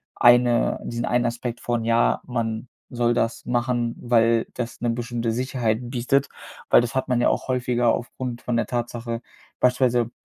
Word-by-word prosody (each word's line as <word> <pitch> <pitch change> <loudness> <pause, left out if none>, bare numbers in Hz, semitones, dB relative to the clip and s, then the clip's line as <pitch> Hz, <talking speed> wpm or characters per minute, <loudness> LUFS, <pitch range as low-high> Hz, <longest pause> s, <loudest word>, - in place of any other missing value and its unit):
eine 120 0 +4
diesen 120 0 -3
einen 120 0 +1
Aspekt 120 0 -3
von, 120 -2 -1
ja, 65 - +2
man 115 -1 -3 0.2
soll 120 -1 +1
das 115 -1 -1
machen, 120 -1 0
weil 115 -1 +3
das 120 -1 -5
'ne 120 - 0
bestimmte 115 -1 -2
Sicherheit 120 -2 -1
bietet, 135 +3 +1 0.4
weil - - +7
das 120 +1 -4
hat 130 - 0
man 125 -1 +1
ja - - +4
auch - - -2
häufiger 125 -2 +1
aufgrund 120 0 -6
von 120 -1 -1
der - - +1
Tatsache 120 -1 -3 0.4
beispielsweise 125 -2 +2
120 Hz, 165 wpm, -23 LUFS, 115-125 Hz, 0.4 s, weil